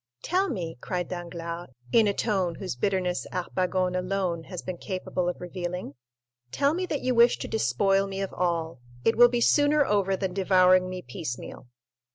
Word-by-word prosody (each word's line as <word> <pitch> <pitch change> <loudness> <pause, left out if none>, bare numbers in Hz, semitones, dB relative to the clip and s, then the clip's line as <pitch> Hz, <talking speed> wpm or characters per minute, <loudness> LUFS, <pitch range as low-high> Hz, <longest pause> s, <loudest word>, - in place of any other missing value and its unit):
"Tell 375 +3 +1
me," 170 - -4
cried 180 -1 -3
Danglars, 170 -1 -6 0.2
in 225 -2 +5
a 200 - +2
tone 190 -6 0
whose 185 -8 -5
bitterness 180 +5 -1
Harpagon30 185 0 -1
alone 180 -3 -2
has 180 -3 -7
been 180 -2 -5
capable 185 -2 -2
of 180 - -5
revealing—"tell 135 - -4
me 365 +2 -2
that 290 - -2
you 255 0 +1
wish 235 0 +5
to - - -5
despoil 195 -3 +1
me 195 0 -5
of 195 -1 -3
all; 165 -5 -1 0.3
it 225 - +4
will 240 +1 +8
be 240 0 0
sooner 290 +2 +4
over 200 -3 +1
than 190 -2 -2
devouring 185 -1 +4
me 185 -1 -6
piecemeal." 130 -8 -7
185 Hz, 170 wpm, -27 LUFS, 175-200 Hz, 0.3 s, will